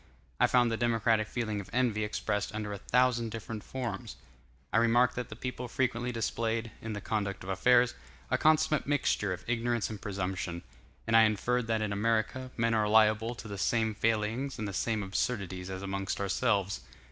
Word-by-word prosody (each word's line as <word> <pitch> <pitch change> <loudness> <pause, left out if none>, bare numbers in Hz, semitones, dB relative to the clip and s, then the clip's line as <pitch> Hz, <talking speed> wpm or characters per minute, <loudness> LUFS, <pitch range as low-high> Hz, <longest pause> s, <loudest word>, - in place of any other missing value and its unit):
I - - +5
found 120 -2 +3
the 115 - 0
democratic 115 -2 +2
feeling 110 -4 -2
of 95 - -13
envy 115 -4 +1
expressed 105 0 -2
under 105 -1 -3
a 100 - -6
thousand 125 0 +2
different 110 -1 -6
forms. 125 -3 -5 0.6
I - - +4
remarked 120 +2 +4
that 125 -1 -4
the 110 - -7
people 125 +1 -5
frequently 125 0 -1
displayed, 115 0 -1
in 110 -1 -4
the 105 - -5
conduct 100 -2 -2
of 95 - -4
affairs, 120 +5 +4 0.4
a - - +3
consummate 155 -1 +3
mixture 140 -8 +1
of 90 - -5
ignorance 120 -1 0
and 105 - -7
presumption; 95 -3 -3 0.4
and 115 - +2
I 115 - +9
inferred 115 +3 +2
that 110 -1 +1
in 105 -1 -1
America, 115 +4 0
men 115 0 +2
are 105 -2 +2
liable 110 +2 +4
to 115 - -9
the 100 -2 -6
same 110 +2 +1
failings 115 +5 0
and 105 - -3
the 100 - -5
same 110 +2 0
absurdities 95 -2 -2
as 95 0 -5
amongst 95 0 -3
ourselves. 100 -1 +1
110 Hz, 180 wpm, -30 LUFS, 105-120 Hz, 0.6 s, I